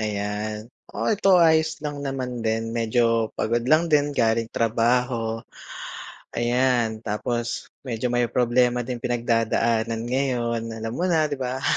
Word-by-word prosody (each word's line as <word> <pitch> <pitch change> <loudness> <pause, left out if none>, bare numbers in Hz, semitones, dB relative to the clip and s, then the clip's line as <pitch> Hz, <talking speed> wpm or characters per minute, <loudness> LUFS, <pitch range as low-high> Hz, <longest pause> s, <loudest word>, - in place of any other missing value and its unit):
ayan. 105 0 -3 0.3
Oo, - - -2
ito 205 -2 +1
ayos 160 -2 +4
lang 145 -1 -4
naman 130 -3 -3
din, 115 0 -1
medyo 115 0 +2
pagod 120 +2 0
lang 160 +4 +3
din 145 -1 +3
galing 115 -1 +1
trabaho. 115 0 +1 0.9
Ayan, 120 -2 +1
tapos 120 +2 -3 0.2
medyo 120 0 -2
may 120 0 +2
problema 125 0 +2
ding 120 0 -5
pinagdadaanan 115 -1 0
ngayon, 125 -3 0
alam 110 0 -5
mo 155 +9 -2
na, 160 -3 +2
'di 145 - -2
ba? 130 0 -3
120 Hz, 135 wpm, -24 LUFS, 115-130 Hz, 0.9 s, ayos